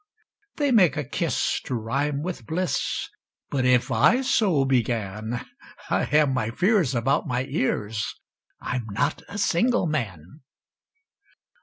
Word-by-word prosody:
They 285 -2 +1
make 180 - +4
a 145 - -1
kiss 150 +4 -1
to 130 - -2
rhyme 140 +6 -1
with 170 -10 -5
bliss, 180 +3 -1 0.4
But 130 -3 0
if 125 -1 +3
I 250 +3 +4
so 190 - +2
began, 115 -3 -1 0.5
I - - +2
have 150 +1 +3
my 130 -4 -1
fears 180 - +2
about 120 +3 +1
my 125 +1 0
ears 115 -7 -2 0.4
I'm 125 -3 -3
not 105 +5 -1
a 205 - -6
single 210 +3 +2
man. 115 - -4
135 Hz, 130 wpm, -25 LUFS, 115-170 Hz, 0.5 s, make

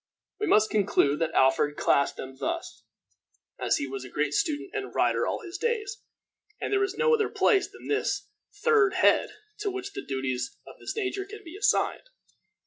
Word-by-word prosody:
We 420 - -1
must 215 -7 +4
conclude 195 -8 +2
that 165 -1 -1
Alfred 135 +2 +3
classed 140 - +2
them 130 0 -7
thus, 140 - -4 0.8
as - - +2
he - - -2
was 135 -1 -6
a 130 - -9
great 145 +2 -1
student 305 - -1
and 410 -1 -5
writer - - +2
all - - -2
his 360 -1 -7
days, 445 -3 -2 0.6
and - - -2
there 400 0 +3
is 395 +1 -2
no 470 0 +3
other 440 -2 +2
place 390 -3 +3
than - - -13
this 425 - -1 0.4
third 420 -5 +4
head 370 - +4 0.3
to 420 -1 -1
which 385 +1 -5
the - - -5
duties 130 -2 -3
of - - -13
this - - -5
nature 390 -2 -2
can 420 +1 -11
be 335 0 -10
assigned. 410 +4 +1
375 Hz, 185 wpm, -27 LUFS, -, 0.8 s, must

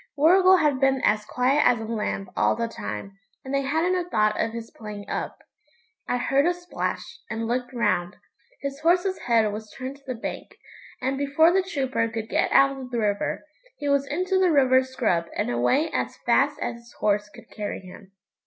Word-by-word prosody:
Warrigal 370 +5 +6
had 295 -6 +2
been 270 0 +3
as 210 0 +2
quiet 260 +4 +2
as 240 - +4
a - - -5
lamb 215 -3 -3
all - - +2
the 230 0 -1
time, 195 - -7 0.3
and 265 - -5
they 275 - +2
hadn't 320 +6 +1
a 350 - -14
thought 215 -6 +2
of 225 - -1
his 230 0 -7
playing 210 -2 -9
up. - - -4 0.7
I 245 - 0
heard 275 +5 +2
a 355 - +1
splash, 355 0 -5
and 225 +1 -3
looked 245 +1 -2
round; 210 -8 0 0.5
his 280 0 -4
horse's 360 +4 +2
head 225 -3 +2
was 215 0 -7
turned 265 +1 -6
to 280 - -27
the 255 - -3
bank, 225 - -6 0.5
and, 270 +1 -1
before 290 +4 +4
the 385 - +4
trooper 265 -10 -1
could 225 -1 -5
get - - +1
out 275 0 +5
of 255 -1 -8
the 245 - -3
river, 205 +3 -1 0.3
he 290 -1 -3
was 280 0 +2
into 370 +6 0
the 370 -1 +4
river 260 -4 +5
scrub 250 -10 0
and - - 0
away 125 - +1
as - - -2
fast - - +3
as - - -3
his 235 0 -17
horse 210 0 0
could - - -16
carry 210 -2 -5
him. 190 +1 -13
255 Hz, 200 wpm, -25 LUFS, 215-285 Hz, 0.7 s, Warrigal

